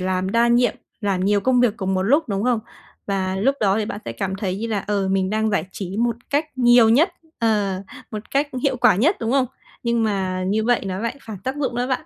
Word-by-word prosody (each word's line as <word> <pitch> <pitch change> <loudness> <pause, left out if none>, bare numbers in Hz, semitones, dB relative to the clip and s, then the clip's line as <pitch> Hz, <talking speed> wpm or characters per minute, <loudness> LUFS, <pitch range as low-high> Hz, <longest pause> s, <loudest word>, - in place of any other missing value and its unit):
làm 185 +1 -1
đa 235 +1 +3
nhiệm, 240 +1 +3 0.3
làm 195 -3 0
nhiều 205 0 +3
công 250 +2 +3
việc 230 -3 +2
cùng 190 -2 -1
một 185 - +1
lúc, 285 +7 +2
đúng 200 +1 -1
không? 245 -3 +2 0.5
Và 190 -1 -1
lúc 265 +8 +2
đó 200 0 +2
thì 215 - 0
bạn 205 -1 -6
sẽ - - -4
cảm 190 -1 -3
thấy 190 -2 -2
như 230 - -3
là, 210 -4 -2
ờ, 200 -2 0
mình 190 0 +1
đang 220 0 +1
giải 200 -5 0
trí 195 0 -5
một 235 0 +1
cách 295 +2 +1
nhiều 240 -2 +6
nhất, 290 - +5 0.3
ờ, 205 -4 0 0.3
một 215 0 -7
cách 285 +1 +1
hiệu 270 -3 +1
quả 230 -6 +4
nhất, 310 - +3
đúng 230 +2 -1
không? 265 -2 +3 0.4
Nhưng 235 -1 +1
mà 190 -3 -1
như 215 +3 +1
vậy 245 0 +2
nó 185 0 -3
lại 230 +4 -3
phản 215 -4 -8
tác 265 +2 -2
dụng 270 -4 -2
đó 245 +1 0
bạn. 265 +4 -2
220 Hz, 250 wpm, -22 LUFS, 195-245 Hz, 0.5 s, nhiều